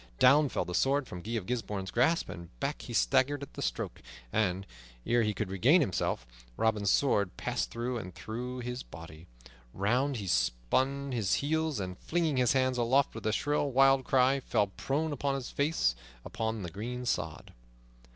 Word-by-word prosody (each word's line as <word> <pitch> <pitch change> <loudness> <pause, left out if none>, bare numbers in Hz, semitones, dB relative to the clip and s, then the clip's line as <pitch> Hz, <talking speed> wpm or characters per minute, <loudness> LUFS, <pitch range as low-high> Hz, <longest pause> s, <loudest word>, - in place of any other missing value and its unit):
Down 145 +3 +6
fell - - -1
the 90 - -5
sword 135 +5 +2
from 90 - -7
Guy 110 +6 -5
of 110 -5 -2
Gisbourne's 105 -5 -3
grasp, 145 +8 +2
and 85 -9 -10
back - - -2
he - - -8
staggered 135 - +2
at 140 - -10
the - - -7
stroke, - - -3 0.3
and, 95 -3 +1 0.4
ere 120 0 +3
he 105 -1 +1
could 105 -2 -4
regain 125 - +5
himself, 95 - -1 0.3
Robin's 110 -3 +1
sword 100 -9 +2
passed - - -2
through 120 +1 -3
and 90 -5 -8
through 125 +3 -5
his 125 +1 -4
body. 80 +1 -11 0.5
Round 125 +8 +1
he 100 - -5
spun 130 - 0
upon - - -4
his 110 -6 +1
heel, 155 -2 0
and, 90 -1 -5
flinging 160 -4 0
his 125 0 +3
hands 130 -1 +1
aloft 130 +4 +3
with 110 -1 -5
a - - +2
shrill, 145 +5 0
wild 135 0 +5
cry, 130 +1 +3
fell 115 -5 +1
prone 145 +10 -2
upon 140 0 -1
his 135 -3 -5
face 140 - +1 0.3
upon 110 -2 -3
the 85 - -5
green 125 +6 -5
sod. 120 - -3
120 Hz, 180 wpm, -30 LUFS, 100-135 Hz, 0.5 s, Down